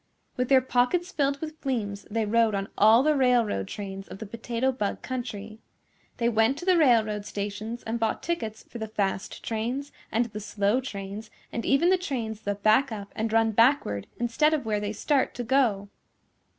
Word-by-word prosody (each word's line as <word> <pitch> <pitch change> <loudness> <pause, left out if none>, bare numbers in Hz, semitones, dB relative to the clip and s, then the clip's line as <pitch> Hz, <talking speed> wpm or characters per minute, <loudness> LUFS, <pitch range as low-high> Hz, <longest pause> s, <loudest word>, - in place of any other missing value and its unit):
With 250 0 -1
their 265 -1 +6
pockets 260 +9 +1
filled 280 -3 0
with 315 -1 -7
fleems 210 -7 -3
they 225 +1 0
rode 225 0 +3
on 195 0 -3
all 220 +4 +6
the 305 0 +3
railroad 240 - +2
trains 195 - -6
of - - -9
the 220 - -7
Potato 230 +4 -1
Bug 210 -6 -3
Country. 220 -4 -5 0.6
They 235 - +1
went 225 +3 +3
to 350 - -7
the 370 -1 +5
railroad 225 -9 +3
stations 210 +3 -5
and 225 +1 -3
bought 225 -1 -1
tickets 225 -11 -3
for 235 - -9
the 220 - -3
fast 195 -2 -3
trains 245 +6 -3 0.2
and 230 +2 +2
the 215 -2 -7
slow 205 +3 0
trains 205 -2 -7 0.2
and 230 - -3
even 305 +7 +4
the 375 - +3
trains 230 - -4
that 205 0 -4
back 230 +5 +4
up 200 -2 -7
and 220 0 -2
run 225 0 +3
backward 230 - +2
instead 270 +7 +2
of 280 -6 -4
where 210 -2 0
they 205 0 -3
start 270 +6 0
to 245 - -3
go. 230 -5 +2
225 Hz, 190 wpm, -27 LUFS, 210-260 Hz, 0.6 s, their